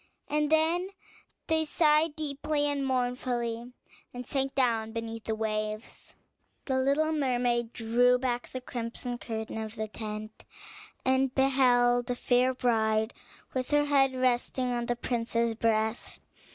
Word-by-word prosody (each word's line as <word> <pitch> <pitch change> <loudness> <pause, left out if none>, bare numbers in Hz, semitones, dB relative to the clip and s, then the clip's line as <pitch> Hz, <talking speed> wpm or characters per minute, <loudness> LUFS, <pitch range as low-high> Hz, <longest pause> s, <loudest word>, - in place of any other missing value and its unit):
And 300 0 0
then 325 +3 +3 0.6
they 320 0 +1
sighed 305 0 +3
deeply 295 0 -1
and 285 -1 0
mournfully, 245 -2 -1 0.4
and 245 0 -7
sank 270 0 -1
down 225 -4 +1
beneath 225 -1 -5
the 220 - -1
waves. 215 0 -4 0.5
The 260 -1 0
little 280 +4 +2
mermaid 245 -5 0
drew 245 +2 +3
back 245 -1 -2
the 255 - -6
crimson 240 0 -5
curtain 220 -1 -5
of 220 0 -6
the 220 -1 -3
tent, 215 0 -7 0.6
and 260 0 +2
beheld 245 -3 +3
the 245 - -1
fair 250 +1 +2
bride 220 -2 +1 0.4
with 255 -1 -2
her 295 0 +3
head 270 -2 +3
resting 255 0 0
on 240 -1 -2
the 240 - 0
prince's 235 -1 -1
breast. 220 0 -1
245 Hz, 135 wpm, -29 LUFS, 230-270 Hz, 0.6 s, then